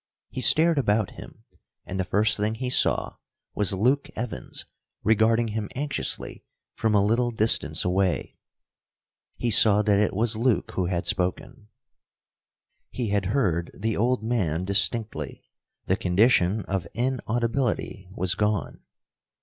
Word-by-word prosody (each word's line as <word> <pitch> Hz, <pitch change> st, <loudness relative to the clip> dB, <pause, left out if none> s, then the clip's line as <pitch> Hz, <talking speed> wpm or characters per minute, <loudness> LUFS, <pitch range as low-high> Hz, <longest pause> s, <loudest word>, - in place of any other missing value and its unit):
He 130 Hz, -, -4 dB
stared 160 Hz, +3 st, +6 dB
about 105 Hz, -5 st, +1 dB
him, -, -, -13 dB, 0.4 s
and 95 Hz, +1 st, -5 dB
the -, -, +1 dB
first 105 Hz, +4 st, +1 dB
thing 105 Hz, +1 st, -2 dB
he 125 Hz, +2 st, -4 dB
saw -, -, +1 dB, 0.4 s
was 105 Hz, -2 st, +1 dB
Luke 125 Hz, +9 st, +1 dB
Evans, 110 Hz, -, -5 dB, 0.4 s
regarding 110 Hz, +1 st, +2 dB
him 105 Hz, -1 st, -4 dB
anxiously 145 Hz, +2 st, -3 dB, 0.3 s
from 110 Hz, -1 st, 0 dB
a 100 Hz, -1 st, +3 dB
little 120 Hz, +3 st, +1 dB
distance 105 Hz, -11 st, +1 dB
away. 90 Hz, 0 st, -1 dB, 1.0 s
He 120 Hz, -, -1 dB
saw 105 Hz, 0 st, +6 dB
that 100 Hz, -1 st, +2 dB
it 105 Hz, -, 0 dB
was 115 Hz, +2 st, +1 dB
Luke 120 Hz, +1 st, 0 dB
who 90 Hz, -2 st, -2 dB
had 85 Hz, -1 st, -2 dB
spoken. 95 Hz, +5 st, -3 dB, 1.2 s
He 120 Hz, -4 st, -4 dB
had 100 Hz, -2 st, 0 dB
heard 90 Hz, -, 0 dB
the 110 Hz, +3 st, -2 dB
old 120 Hz, +1 st, 0 dB
man 95 Hz, -8 st, -1 dB
distinctly. 110 Hz, +3 st, -1 dB, 0.4 s
The -, -, 0 dB
condition 100 Hz, +1 st, +2 dB
of 95 Hz, -3 st, -3 dB
inaudibility 120 Hz, -4 st, -2 dB
was 90 Hz, 0 st, +1 dB
gone. 105 Hz, -3 st, -2 dB
105 Hz, 135 wpm, -25 LUFS, 95-120 Hz, 1.2 s, stared